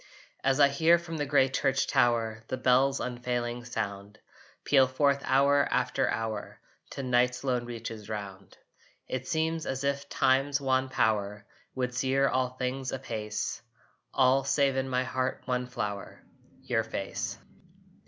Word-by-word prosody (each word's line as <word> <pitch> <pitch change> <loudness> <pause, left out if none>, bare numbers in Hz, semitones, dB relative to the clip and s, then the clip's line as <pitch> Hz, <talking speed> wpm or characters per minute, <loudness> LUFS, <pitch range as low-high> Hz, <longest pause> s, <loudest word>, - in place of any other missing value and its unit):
As 135 +1 +2
I 140 - +8
hear, 160 +4 +4
from 165 -1 -6
the 145 -1 -2
gray 135 -1 +4
church 135 0 +1
tower, 115 -2 +1
The 130 - -3
bell's 130 +2 +3
unfailing 120 -1 -3
sound 105 -3 -5 0.5
Peal 135 -2 +5
forth 140 +1 +2
hour 140 +2 +3
after 125 0 +1
hour 110 -2 -4 0.3
To 135 - -5
night's 125 0 +1
lone 125 -3 0
reaches 115 -3 -7
round, 100 -2 -7 0.5
It 130 0 -4
seems 160 0 -1
as 135 +1 -3
if 140 0 -1
Time's 135 +2 +2
wan 130 -1 +1
power 105 -4 0 0.3
Would 125 -1 -2
sear 135 +2 +2
all 130 -1 +1
things 130 +1 -3
apace 110 -5 -4 0.5
All, 130 +1 +3
save 135 0 +2
in 135 0 -1
my 130 0 +1
heart 130 0 -2
one 125 0 -1
flower, 100 -5 -5 0.4
Your 115 -2 0
face. 100 -3 -4
130 Hz, 145 wpm, -29 LUFS, 120-135 Hz, 0.5 s, I